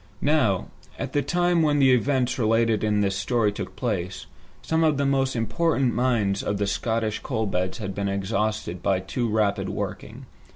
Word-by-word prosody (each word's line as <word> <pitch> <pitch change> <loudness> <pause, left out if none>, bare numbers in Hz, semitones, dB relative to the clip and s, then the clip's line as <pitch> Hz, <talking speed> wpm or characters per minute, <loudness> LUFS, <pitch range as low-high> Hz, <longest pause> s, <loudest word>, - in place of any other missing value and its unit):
Now, 145 -11 +2 0.3
at - - -5
the 145 - +2
time 175 +1 +1
when 150 -2 +2
the 135 -2 +5
events 130 0 +1
related 115 -1 +2
in 105 -1 +2
this 100 -1 0
story 105 +2 +1
took 100 - -7
place, 95 -7 -3 0.4
some 160 0 +1
of 155 -3 +3
the 140 - +1
most 135 -1 +1
important 135 +2 +1
mines 110 -5 +1
of 105 - -2
the 100 - 0
Scottish 110 +1 -1
coal 110 -5 -2
beds 90 -2 -2
had 100 -4 -5
been 100 0 -2
exhausted 100 -2 -2
by 95 0 +1
too 105 +6 -2
rapid 105 -2 0
working. - - -5
110 Hz, 175 wpm, -25 LUFS, 100-135 Hz, 0.4 s, the